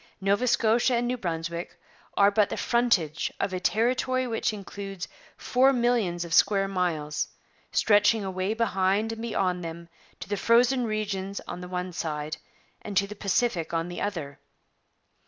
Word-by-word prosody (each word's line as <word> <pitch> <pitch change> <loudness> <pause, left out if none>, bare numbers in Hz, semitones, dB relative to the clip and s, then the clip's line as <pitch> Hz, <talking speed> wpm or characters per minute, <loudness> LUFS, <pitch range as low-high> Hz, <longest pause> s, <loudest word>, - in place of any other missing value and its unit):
Nova 200 +5 +1
Scotia 235 +2 +3
and 240 +1 +1
New 250 - 0
Brunswick 170 -4 -4 0.4
are 200 0 +6
but 205 0 +3
the - - -4
frontage 205 -10 +1
of 190 - -1
a 185 - -1
territory 255 +5 +1
which 225 -2 -1
includes 195 -2 -7 0.3
four 260 +2 +3
millions 235 -9 +1
of 165 - -5
square 195 +1 +4
miles, 170 -6 -1 0.4
stretching 210 0 +4
away 190 +2 -2
behind 205 -1 +1
and 225 0 -6
beyond 185 -6 -1
them 170 +1 -7 0.3
to - - -7
the 205 - -2
frozen 245 +4 +3
regions 200 -3 -3
on 180 - -7
the 180 - -7
one 180 0 -4
side 155 -1 -3 0.4
and 205 -2 -4
to 200 - +4
the 205 - -8
Pacific 200 -4 0
on 165 +1 -1
the 175 - -6
other. 165 -9 -4
200 Hz, 155 wpm, -27 LUFS, 180-225 Hz, 0.4 s, are